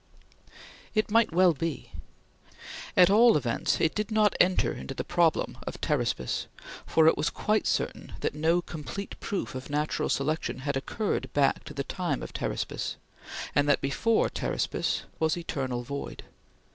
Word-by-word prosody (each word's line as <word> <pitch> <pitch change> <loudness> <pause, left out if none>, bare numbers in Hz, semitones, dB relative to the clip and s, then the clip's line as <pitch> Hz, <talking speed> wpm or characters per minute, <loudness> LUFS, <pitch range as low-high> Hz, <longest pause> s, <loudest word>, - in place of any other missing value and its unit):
It 215 -1 +1
might 230 -2 +4
well 180 +1 +5
be! 165 0 -4 1.1
At 180 +1 +7
all 230 -1 +7
events, 120 -5 0
it 160 - +2
did 210 -1 -2
not 215 -2 +3
enter 185 +1 +3
into 135 - -7
the - - -3
problem 170 -2 +1
of - - -5
Pteraspis, 65 - -1 0.4
for 160 - +4
it 160 - +6
was 155 - 0
quite 215 0 0
certain - - -2
that - - -1
no 165 +3 +2
complete 170 +6 -6
proof 200 - -3
of 130 +1 -7
Natural 150 +1 -1
Selection 140 -2 -1
had 140 +1 -2
occurred 135 - -2
back 140 -2 +2
to - - -9
the 140 - -2
time 180 +4 -2
of - - -8
Pteraspis, - - -3 0.6
and 145 0 +3
that 145 - +4
before 220 +12 +2
Pteraspis - - -1 0.2
was 160 +1 +1
eternal 130 -7 -3
void. 140 +3 -6
160 Hz, 155 wpm, -28 LUFS, 140-195 Hz, 1.1 s, At